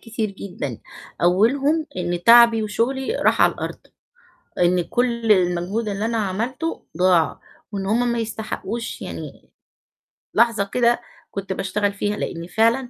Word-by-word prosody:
كتير 225 -2 -3
جدًا، 175 - -6 0.4
أولهم 270 - +3
إن 175 -1 -2
تعبي 230 -1 +7
وشغلي 265 - -1
راح - - +3
على - - +5
الأرض، - - -6 0.8
إن 175 0 +3
كلّ 235 +3 0
المجهود 185 +4 +1
اللي 205 +1 -2
أنا 230 0 -1
عملته 230 - -3
ضاع، 180 -3 +3 0.3
وإن 195 -1 -3
هُم 235 +4 +1
ما 235 - -1
يستحقوش 225 +1 -4
يعني - - -8 0.8
لحظة 230 -3 +3
كده 240 +3 +1 0.3
كنت 195 -1 -4
باشتغل 200 +2 -1
فيها، 205 +1 -2
لإن 170 0 -4
فعلًا 230 +6 +2
215 Hz, 130 wpm, -22 LUFS, 185-235 Hz, 0.8 s, تعبي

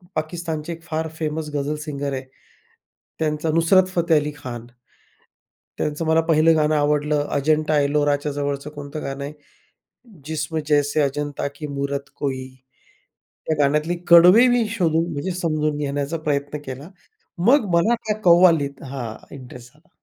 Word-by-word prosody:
पाकिस्तानचे 160 0 -4
फार 160 0 -3
फेमस 155 0 -3
गझल 145 +1 -1
सिंगर 140 -2 -4
आहे, 130 0 -4 1.0
त्यांच 155 0 -1
नुसरत 165 +4 +4
फतेह 170 -2 +3
अली 150 0 -4
खान. 120 -4 -8 1.1
त्यांचं 150 +2 -2
मला 160 +1 +3
पहिलं 160 +1 +5
गाणं 155 0 +2
आवडलं, 150 0 +1
अजंठा 155 +1 +2
एलोराच्या 145 0 +1
जवळचं 140 0 -3
कोणतं 145 +1 -7
गाणं 140 0 -5
आहे? 145 +2 -6 0.9
"जिस्म 155 +1 -3
जैसे 145 0 +2
अजंता 145 0 -2
की 150 +1 -6
मूरत 140 -1 -4
कोई" 130 -2 -3 1.0
त्या 160 - +1
गाण्यातली 150 +5 +1
कडवे 180 +8 +8
मी 245 -2 +2
शोधून, 170 -5 0
म्हणजे 150 +6 -3
समजून 155 -2 0
घेण्याचा 145 +2 -2
प्रयत्न 145 0 -1
केला, 135 +5 -8 0.6
मग 275 -1 +5
मला 220 +8 +3
त्या 210 - +1
कव्वालीत 170 -6 +4
हां, 130 -5 -6 0.2
इंटरेस्ट 125 0 -12
झाला. 150 +1 -28
150 Hz, 135 wpm, -22 LUFS, 140-165 Hz, 1.1 s, कडवे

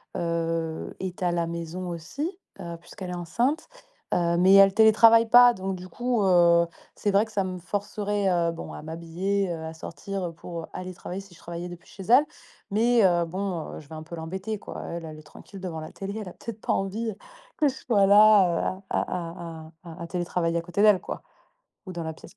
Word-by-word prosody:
heu, 165 -1 -2
est 185 -1 -5
à 175 -1 +2
la 170 -1 0
maison 170 +2 -5
aussi, 280 - -5 0.2
heu, 170 -1 -6
puisqu'elle 185 +2 -9
est - - -4
enceinte, 240 - -1 0.5
heu, 170 -1 +2
mais 185 +2 +6
elle 195 -1 +8
télétravaille 225 +1 +6
pas. 245 +1 +8
Donc 190 -2 -4
du 180 0 -9
coup, 240 +3 0
heu, 170 -2 +5 0.3
c'est 205 - 0
vrai 200 +2 +4
que 220 - -15
ça 195 - +1
me 185 -1 -4
forcerait, 205 +2 -2
heu, 170 -2 +2
bon 165 - -8
à - - -7
m'habiller, 170 +5 -2
heu, 165 -1 -4
à 160 - -6
sortir 175 +2 -5
pour 170 -2 -7
aller 185 0 -6
travailler 180 +1 -6
si 195 -2 -16
je - - -18
travaillais 170 +1 -6
depuis 175 -1 -12
chez 195 - -10
elle. 250 +9 +5 0.5
Mais 230 +2 +4
heu, 175 -2 +3
bon, 180 -1 -4
je 150 - -18
vais 160 - -8
un 155 - -7
peu 170 +2 -8
l'embêter, 190 +6 -4
quoi. - - -8
Elle, 170 0 -5
elle 155 -1 -9
est - - -14
tranquille 190 +6 -13
devant 180 -4 -5
la 155 - -8
télé, 200 +2 -5
elle 195 - -7
a - - -11
peut-être 225 -2 -8
pas - - -1
envie 215 +4 -2 0.4
que 300 - +3
je - - -5
sois 205 -6 +2
là 200 -2 +5
à - - +1
à 170 -2 -5 0.2
à - - -9
à 165 +2 -10
à - - -6
télétravailler 170 -1 -1
à - - 0
côté 175 +3 -2
d'elle 210 -3 +6
quoi, - - -7 0.6
ou 185 - -6
dans 170 -1 -5
la 160 0 -4
pièce 155 - -15
180 Hz, 215 wpm, -26 LUFS, 170-205 Hz, 0.6 s, elle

